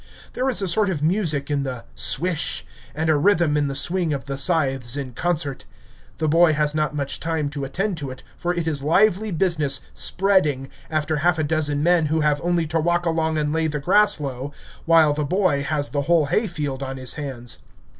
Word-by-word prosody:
There 260 +1 -1
is 230 -6 -1
a - - -1
sort 200 +4 +2
of 155 -6 -3
music 155 -5 +1
in 145 -1 0
the 130 -3 -5
"swish" 165 +5 +1 0.3
and 160 +1 -1
a 155 - +4
rhythm 170 -1 +2
in 145 -1 +1
the 135 - -4
swing 170 +1 +1
of 135 - -6
the 140 - -4
scythes 135 -4 +1
in 135 -3 -5
concert. 155 -1 -2 0.5
The 160 - -1
boy 165 +1 +4
has 150 -1 0
not 155 -1 -1
much 140 -2 -2
time 160 -3 -2
to 140 -2 -4
attend 190 +7 -2
to 140 -3 -5
it, 130 0 -10
for 175 - -2
it 175 -2 -2
is 150 -3 0
lively 195 +7 +2
business 155 -6 +1
"spreading" 165 -9 +1 0.2
after 155 0 -1
half 175 +3 +2
a 155 - 0
dozen 150 -1 0
men 170 -2 +3
who 160 +1 0
have 150 -1 +1
only 175 -1 +1
to 160 +1 -1
walk 175 +2 0
along 160 -1 0
and 150 0 -1
lay 160 0 +1
the 150 -1 -3
grass 205 +6 +4
low, 135 -1 -5 0.3
while 165 -3 +5
the 150 +1 -2
boy 175 -2 +1
has 145 0 -2
the 145 - -1
whole 165 +1 +2
hay 215 +10 0
field 145 -6 -4
on 135 0 -5
his 130 -1 -1
hands. 130 -5 -5
155 Hz, 210 wpm, -22 LUFS, 140-175 Hz, 0.5 s, while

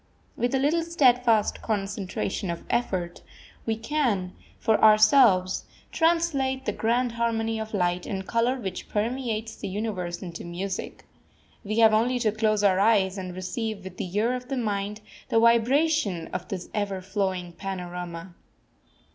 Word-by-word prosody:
With 245 +2 0
a - - +3
little 295 +5 +2
steadfast 250 -9 +3
concentration 195 -2 -3
of 170 -1 -4
effort 185 -8 -1 0.5
we 225 - +1
can, 225 -8 -1 0.2
for 220 -2 +1
ourselves, 215 -3 +5 0.3
translate 310 -6 +1
the - - +1
grand 240 +2 0
harmony 225 -1 -1
of 220 0 -5
light 175 -1 0
and 190 -1 -4
colour 235 +2 +1
which 190 -5 -6
permeates 225 0 -2
the - - -5
universe 190 -4 -3
into 170 -2 -7
music. 185 +3 -5 0.6
We 215 +1 -3
have 225 -1 +6
only 240 +4 +2
to 225 -3 +1
close 215 -1 +1
our 190 -2 +4
eyes 200 -2 +3
and 180 -1 -6
receive 200 +2 -4
with 185 -1 -9
the 185 +1 -5
ear 230 +4 +2
of 250 0 -5
the 270 0 -3
mind 210 -2 -2 0.3
the 225 - +3
vibration 235 - +2
of 180 -1 -4
this 185 -2 -5
ever 200 -3 -2
flowing 190 -2 -2
panorama. 180 -2 -6
215 Hz, 145 wpm, -26 LUFS, 190-235 Hz, 0.6 s, have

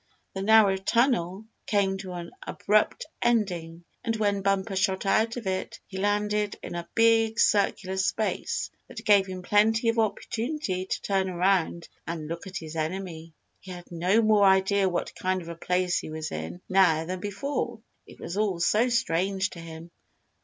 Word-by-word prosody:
The 190 - -4
narrow 210 -2 +5
tunnel 210 -2 +1 0.2
came 200 -2 +2
to 185 -2 -7
an 170 -1 -7
abrupt 210 +1 +1 0.2
ending, 175 -8 0 0.2
and 225 - -1
when 205 -2 0
Bumper 195 +1 0
shot 190 0 0
out 225 +4 +2
of 235 - -6
it 190 0 -3
he 190 -1 -7
landed 210 +1 0
in - - -6
a 170 0 -5
big, 225 0 +4
circular 195 -2 +2
space 190 0 -1 0.2
that 220 - -9
gave 200 -2 +5
him 185 -1 -6
plenty 220 +4 +3
of 230 0 +1
opportunity 220 -2 -2
to - - -2
turn 195 -1 0
around 180 -2 +1 0.2
and 165 -2 -4
look 165 +4 -6
at 190 0 -5
his 160 0 -8
enemy. 165 0 -4 0.3
He 190 - -14
had 175 -1 -9
no 180 +7 +2
more 215 -1 +4
idea 190 0 +4
what 175 - -3
kind 185 0 -1
of 170 -2 -9
a 170 - -6
place 180 +1 0
he - - -7
was 155 0 -5
in 80 +3 -6
now 175 -4 +4
than 185 +2 -4
before. 235 +4 -3 0.3
It - - -15
was 175 - -6
all 205 -5 0
so 215 +8 +3
strange 190 -3 0
to 170 - -10
him. 165 0 -10
190 Hz, 175 wpm, -27 LUFS, 175-210 Hz, 0.3 s, narrow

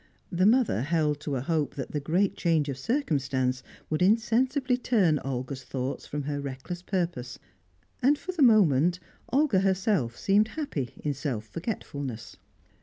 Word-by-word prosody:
The 185 +2 +3
mother 235 - +3
held 150 0 +1
to 145 -1 -3
a 125 - -1
hope 155 +1 -1
that 135 - -5
the 150 - -1
great 175 +7 +1
change 160 -4 +1
of 135 - -3
circumstance 130 - 0 0.3
would 155 - 0
insensibly 245 +6 +2
turn 200 - +2
Olga's 130 0 -4
thoughts 130 0 -4
from 145 0 -4
her 145 0 -3
reckless 140 +6 -6
purpose; 170 -10 -3 0.6
and, 285 +4 +4
for 370 - -5
the 350 -4 -3
moment, 180 - +5 0.3
Olga 270 -6 +3
herself 190 - +1
seemed 205 +2 +3
happy 155 - -3
in 145 - 0
self 130 -6 -3
forgetfulness. 145 - -5
160 Hz, 150 wpm, -27 LUFS, 135-210 Hz, 0.6 s, moment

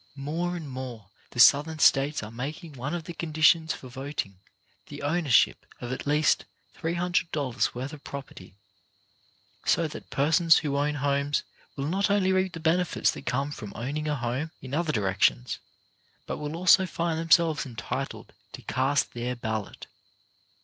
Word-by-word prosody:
More 165 +6 -2
and 165 -4 -6
more 125 -6 -7 0.2
the 120 - -8
Southern 150 +6 +6
States 145 -2 +3
are 105 - -7
making 145 +7 -6
one 140 +5 -4
of 170 - -4
the 170 - -7
conditions 160 0 +3
for 130 - -11
voting, 130 -7 -5 0.5
the 145 0 -8
ownership 150 -4 +3 0.2
of 120 - -5
at 130 - -5
least 150 +2 +3 0.3
$300 165 -7 -1
worth 130 +5 -5
of 150 - -11
property, 135 -10 -9 1.1
so 165 - +2
that 150 - -10
persons 160 +4 +4
who 140 -2 -1
own 145 +1 +1
homes 140 +1 0 0.3
will 140 - -3
not 195 +7 +1
only 195 -2 +3
reap 185 -1 +1
the 165 - -6
benefits 170 +2 +2
that - - -10
come 135 +4 0
from 105 -8 -7
own 125 +5 -4
ing 155 0 -3
a 150 - 0
home, 130 +4 -2
in 130 0 -9
other 160 +1 +1
directions, 95 - +1 0.7
but - - -4
will 150 +1 -4
also 185 +2 +5
find 165 -1 -1
themselves 165 -3 +3
entitled 115 -2 -5 0.2
to - - -9
cast 135 +2 0
their 120 +1 -3
ballot. 110 -3 -4
145 Hz, 160 wpm, -27 LUFS, 130-165 Hz, 1.1 s, Southern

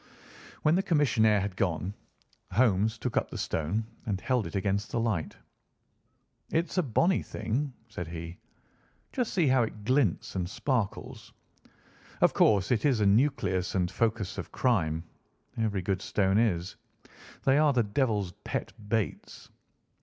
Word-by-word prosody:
When 155 - +4
the 185 - +3
commissionaire 115 - +3
had 100 -1 -3
gone, 90 +1 -1 0.6
Holmes 110 -1 +3
took 125 0 -4
up - - +1
the - - -6
stone 85 +8 -1 0.2
and 100 -3 -1
held 125 +1 0
it - - -8
against 100 +2 0
the 120 - -1
light. 110 -9 -1 1.1
"It's 170 +3 -1
a - - +5
bonny 170 - +2
thing," 135 +5 -3 0.2
said 90 -7 -6
he. 85 +1 -7 0.7
"Just 250 -4 -1
see 175 -5 +2
how 130 -2 +4
it 110 -2 -3
glints 125 - +1
and 90 -2 -2
sparkles. 115 -2 -3 0.9
Of - - +4
course 100 -1 +3
it 120 - +2
is 135 -6 +3
a - - +3
nucleus 100 -5 +2
and 90 -2 +1
focus 110 -4 -1
of - - -7
crime. 80 -11 +1 0.5
Every 105 -4 -1
good 95 0 -1
stone 95 0 +2
is. 90 -6 0 0.7
They 135 +2 +4
are 150 -1 +5
the 125 -3 +2
devil's 105 -3 0
pet - - -3 0.2
baits. 110 -2 -3
110 Hz, 145 wpm, -29 LUFS, 95-130 Hz, 1.1 s, a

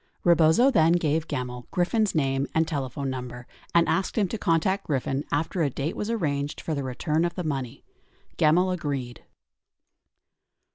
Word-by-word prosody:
Rebozo 170 - +5
then 165 -7 +4
gave 160 -2 +1
Gemmill 125 -3 -5
Griffin's 190 +3 +1
name 135 -2 +1
and 160 0 +3
telephone 140 -3 -3
number 125 -1 -6 0.3
and 170 0 +5
asked 195 - 0
him 205 -3 +3
to 225 - -3
contact 170 +4 +1
Griffin 135 -1 -1
after 165 +4 -1
a 150 - +2
date 140 +5 -3
was 210 - -3
arranged 145 -10 -1
for 160 - -3
the 140 - -2
return 150 +5 -1
of 170 0 -1
the 180 - -3
money. 135 -6 -4 0.5
Gemmill 175 +5 +3
agreed. 140 -8 -4
155 Hz, 155 wpm, -26 LUFS, 135-175 Hz, 0.5 s, Rebozo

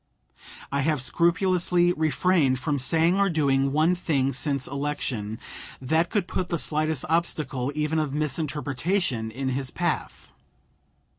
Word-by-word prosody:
I 140 - 0
have 150 0 +1
scrupulously 175 +4 +2
refrained 155 -3 +2
from 140 +3 -1
saying 165 +7 +3
or 200 0 +3
doing 140 -4 +2
one 155 +5 +3
thing 140 -6 0
since 140 0 -1
election 135 -7 -3 0.4
that 160 +6 +1
could 195 -3 0
put 185 - -2
the 170 - 0
slightest 155 -2 -1
obstacle, 150 -5 -1
even 155 +1 0
of 150 -3 -1
misinterpretation, 150 - -1
in 130 +4 -3
his 130 0 -1
path. - - -3
150 Hz, 130 wpm, -25 LUFS, 135-170 Hz, 0.4 s, saying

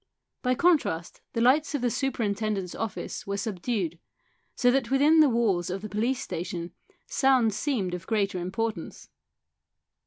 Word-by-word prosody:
By 255 0 +1
contrast 280 - +1
the 230 - 0
lights 285 +5 +3
of 265 - -2
the 245 - +2
superintendent's 215 -7 -1
office 225 -3 -5
were 200 0 -2
subdued, 195 -4 -2 0.6
so 245 -1 +4
that 255 -2 +1
within 290 +4 +5
the 305 -2 +7
walls 205 -7 +1
of 190 +2 -4
the 215 - -5
police 235 +6 0
station 175 0 -5 0.3
sounds 255 -6 +3
seemed 215 -7 -1
of 180 -1 -6
greater 200 -4 0
importance. 220 +5 -4
220 Hz, 145 wpm, -27 LUFS, 190-255 Hz, 0.6 s, the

